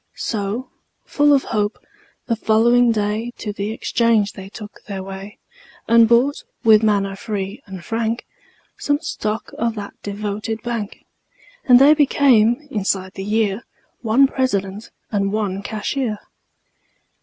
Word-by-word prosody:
So, 215 +4 -3 0.3
full 290 0 +3
of 275 -2 +4
hope, 210 -1 -1 0.5
the 230 - 0
following 235 +2 +3
day 215 +2 -2
To 210 -2 -5
the 200 +1 -3
exchange 225 -2 +1
they 195 -1 -10
took 210 0 -11
their 195 -2 -5
way 195 +1 -9 0.5
And 230 -1 +6
bought, 250 +5 +3 0.2
with 220 -1 +6
manner 200 -3 +1
free 200 +2 -5
and 190 -3 -9
frank, 225 +1 -2 0.5
Some 290 0 +1
stock 220 -8 -4
of 230 -1 0
that 205 -2 -7
devoted 210 +2 -4
bank; 230 -4 -5 0.6
And 250 -2 +7
they 280 +4 +7
became, 270 -3 +3
inside 195 -3 -1
the 195 - -6
year, 210 0 0 0.4
One 240 +4 +4
President 210 -6 -2 0.2
and 200 -2 0
one 200 -2 -2
Cashier. 220 +2 -3
215 Hz, 130 wpm, -20 LUFS, 200-235 Hz, 0.6 s, And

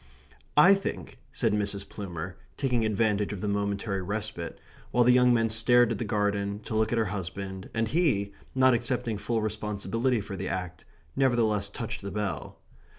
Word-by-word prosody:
"I 180 +7 +9
think," 195 0 -4
said 110 - +1
Mrs. 100 -1 0
Plumer, 90 -3 -6 0.2
taking 125 -5 +1
advantage 105 -1 +1
of 95 - -6
the 105 - -2
momentary 100 0 -1
respite, 100 -3 -4 0.3
while 120 - +3
the 125 +1 +6
young 125 0 +5
men 115 -1 +3
stared 120 +2 +4
at 115 - -2
the - - -1
garden, 105 -1 0
to - - -7
look 110 0 +2
at 120 - +1
her 115 - +2
husband, 95 0 -5
and 115 0 0
he, 110 - +1 0.2
not 130 -1 +5
accepting 120 -2 -1
full 115 -1 -1
responsibility 110 +3 -1
for 100 -1 -6
the 95 0 -4
act, 90 -1 -5 0.3
nevertheless 115 -6 +2
touched 115 +1 -5
the 100 - -5
bell. 100 -9 -4
105 Hz, 170 wpm, -28 LUFS, 100-115 Hz, 0.3 s, I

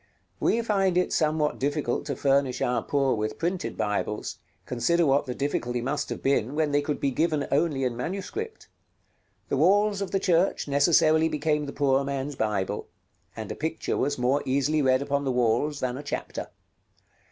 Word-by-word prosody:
We 230 - +2
find 195 -5 +1
it 180 - +1
somewhat 155 -1 +1
difficult 145 -1 -1
to 140 - -2
furnish 135 -2 +1
our 125 -1 +1
poor 135 0 +1
with 110 -1 -2
printed 175 +3 -2
Bibles; 105 +1 -2 0.3
consider 165 +8 +1
what 140 0 +2
the 125 - -3
difficulty 125 -3 -1
must 135 +5 -2
have - - -5
been 135 -1 +1
when 155 -1 +1
they 145 0 +3
could 145 0 -3
be 140 - 0
given 155 +1 0
only 145 -2 +1
in 125 -2 -1
manuscript. 195 - -5 0.8
The 140 - 0
walls 200 +6 +3
of 195 - -2
the 195 - 0
church 180 -3 +1
necessarily 155 +2 +4
became 150 -1 0
the - - -4
poor 140 -1 +2
man's 140 +1 -3
Bible, 105 -5 -2 0.5
and - - -6
a - - -4
picture 160 +1 -2
was 145 - 0
more 130 +3 +1
easily 140 +3 +1
read 130 0 +3
upon 140 0 -1
the 135 - 0
walls 125 +4 +1
than 125 0 -1
a - - -7
chapter. 145 - -4
145 Hz, 175 wpm, -26 LUFS, 130-160 Hz, 0.8 s, necessarily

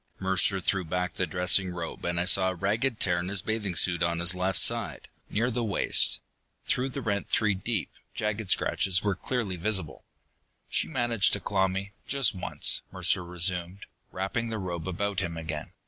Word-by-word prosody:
Mercer 95 +1 +1
threw 95 +1 0
back 90 +2 -2
the 90 - -1
dressing 90 +1 +2
robe, 85 -2 -6
and 85 0 0
I 85 - +1
saw 95 0 +5
a 95 - -3
ragged 110 +7 0
tear 90 -2 +2
in 90 - -3
his 100 -1 0
bathing 105 -4 -2
suit 85 -1 +4
on 85 0 +1
his 85 +2 +2
left 90 0 -1
side, - - 0 0.2
near 115 +4 0
the 120 +1 -1
waist. 100 -4 +1 0.5
Through 130 +2 0
the 135 0 -5
rent 100 -3 -1
three 105 -2 +3
deep, 100 +2 -1 0.2
jagged 105 -1 -2
scratches 95 -1 +2
were 100 -2 +2
clearly 105 -2 -2
visible. 95 -4 -3 0.7
"She - - +1
managed 120 -7 +2
to - - +2
claw 95 -1 +1
me, 95 +2 -4 0.2
just 140 -2 +3
once," 90 - +1
Mercer 90 - +2
resumed, 90 +1 -1 0.3
wrapping 115 +5 -2
the 110 - -3
robe 90 -4 -4
about 100 +1 -1
him 85 -4 -3
again. 80 -2 -5
95 Hz, 180 wpm, -28 LUFS, 90-105 Hz, 0.7 s, saw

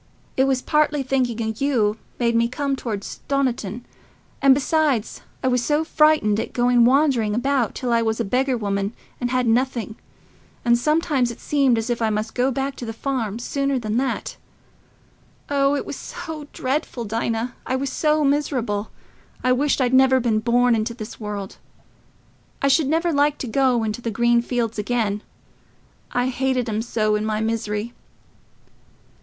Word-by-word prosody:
It 265 - +3
was 265 -1 0
partly 300 -2 +2
thinking 255 -3 0
o' 220 0 -2
you 225 -6 +1 0.2
made 235 -1 +1
me 230 0 +3
come 275 +3 -2
toward 225 -6 -4
Stoniton; 245 -6 -2 0.6
and, 275 -1 +6
besides, 285 -5 0 0.2
I - - +2
was 250 -1 +2
so 300 +3 +1
frightened 305 -10 +3
at - - -4
going 245 -1 +4
wandering 255 -5 +3
about 255 -1 0
till 245 -2 -1
I 230 - +3
was 220 0 -1
a 230 - 0
beggar 255 +4 +1
woman, 200 -1 -2 0.3
and 245 - -1
had 255 0 +1
nothing; 235 -1 0 0.7
and 235 0 +5
sometimes 300 -1 +1
it 235 - -8
seemed 275 -5 +2
as 225 +2 -1
if 235 - -2
I 225 - +2
must 215 +1 -2
go 255 +1 +1
back 270 +1 -2
to 245 - -6
the 225 - -4
farm 225 -4 -2
sooner 275 +3 -1
than 220 -2 -2
that. 265 +1 -2 1.1
Oh, 280 0 +3
it - - -3
was - - -6
so 310 -3 -7
dreadful, 260 -3 -2
Dinah... 230 +2 -2
I 260 - 0
was 270 0 -2
so 305 0 +2
miserable... 255 -7 0 0.5
I 255 - +3
wished 280 +4 +2
I'd 255 -1 +1
never 260 0 +5
been 230 -3 +1
born 240 +2 +3
into 225 +1 -1
this 215 -1 -8
world. 205 -3 -5 1.0
I 275 - +2
should 275 +1 +3
never 330 +3 +1
like 290 0 +2
to 260 - -5
go 250 -1 +2
into 215 +2 -3
the 235 - -2
green 235 +2 +3
fields 235 -3 -2
again—I 225 +3 -4
hated 260 -1 0
'em 215 0 -1
so 215 -2 0
in 210 - -1
my 215 0 -1
misery." 220 0 -2
245 Hz, 170 wpm, -22 LUFS, 225-275 Hz, 1.1 s, and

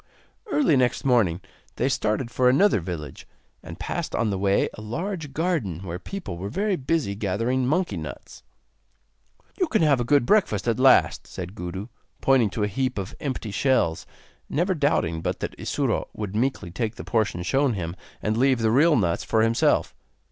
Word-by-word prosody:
Early 280 - +3
next 125 +2 +1
morning 105 -10 +3 0.3
they - - 0
started 115 +3 -1
for 125 0 +3
another 185 - +4
village, 85 -4 -7 0.3
and - - -9
passed - - -3
on 115 -2 +1
the 95 - -2
way 100 0 +2
a - - -10
large 160 - -4
garden 140 - -1
where 90 -2 -5
people 180 - -6
were 100 +2 -4
very 200 - 0
busy 140 - -1
gathering 115 +6 -1
monkey 175 +6 0
nuts. - - -8 1.2
'You 365 - +2
can 220 - +2
have 145 -4 +4
a - - +1
good 140 +1 +3
breakfast 120 - +2
at 115 +1 +1
last,' 130 0 +4
said 90 0 -7
Gudu, 95 +1 -6 0.3
pointing 130 -5 +3
to 105 +2 -2
a - - +2
heap 130 +4 -2
of 95 -1 -4
empty 130 -6 -4
shells; 100 -8 +1 0.4
never 175 +6 +1
doubting 140 - 0
but - - -2
that - - -4
Isuro - - -1
would 105 -2 -5
meekly 115 -6 -1
take 115 +3 -3
the - - -8
portion 105 -7 0
shown 135 +6 +2
him, 85 -2 -4 0.3
and 105 0 0
leave 130 +2 +3
the 110 -1 +2
real 150 +6 +5
nuts 90 -8 +1
for 110 -1 +2
himself. 115 +1 +2
115 Hz, 175 wpm, -25 LUFS, 100-140 Hz, 1.2 s, real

